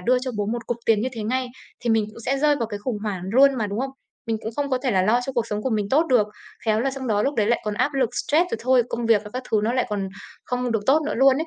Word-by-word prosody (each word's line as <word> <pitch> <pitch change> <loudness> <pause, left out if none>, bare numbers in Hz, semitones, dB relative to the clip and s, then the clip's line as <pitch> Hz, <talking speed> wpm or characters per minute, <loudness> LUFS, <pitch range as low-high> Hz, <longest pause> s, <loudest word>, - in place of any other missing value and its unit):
đưa 250 +7 +3
cho 255 +1 -4
bố 205 - 0
một 230 +1 -3
cục 240 - -1
tiền 220 -2 +4
như 250 - 0
thế 225 -3 -5
ngay 255 +3 -1 0.3
thì 240 - -1
mình 225 -1 +3
cũng 230 - -12
sẽ 270 +2 +1
rơi 295 0 +3
vào 230 - -1
cái 205 -2 -5
khủng 215 0 -3
hoảng 200 -5 -3
luôn 275 +3 +6
mà, 225 -5 -1
đúng 205 +3 -3
không? 270 +1 -2 0.4
Mình 225 -1 0
cũng 220 - -3
không 285 -1 -1
có 255 - +2
thể 265 - +1
là 190 -4 +3
lo 225 +6 +3
cho 270 - -3
cuộc 235 -2 0
sống 210 -1 -3
của 260 - -1
mình 210 -2 0
tốt 310 +7 +3
được, 245 -7 +3 0.4
khéo 220 -1 +2
là 270 +3 +1
xong 265 -1 -6
đó 210 -2 +1
lúc 280 +4 0
đấy 215 -2 +1
lại 235 +2 +2
còn 210 -1 -2
áp 285 +7 0
lực 260 -4 +1 0.2
stress 340 +5 +3
rồi - - -2
thôi, 255 0 +4
công 235 -1 -3
việc 220 -3 +4
và 210 - -9
các 255 +1 -4
thứ 215 - +3
nó 230 - +1
lại 255 0 +1
còn 200 -2 -2 0.4
không 250 -1 -1
được 225 - +1
tốt 300 +4 +4
nữa - - -1
luôn 265 +1 +5
ấy. 320 +3 -2
240 Hz, 330 wpm, -23 LUFS, 215-265 Hz, 0.4 s, luôn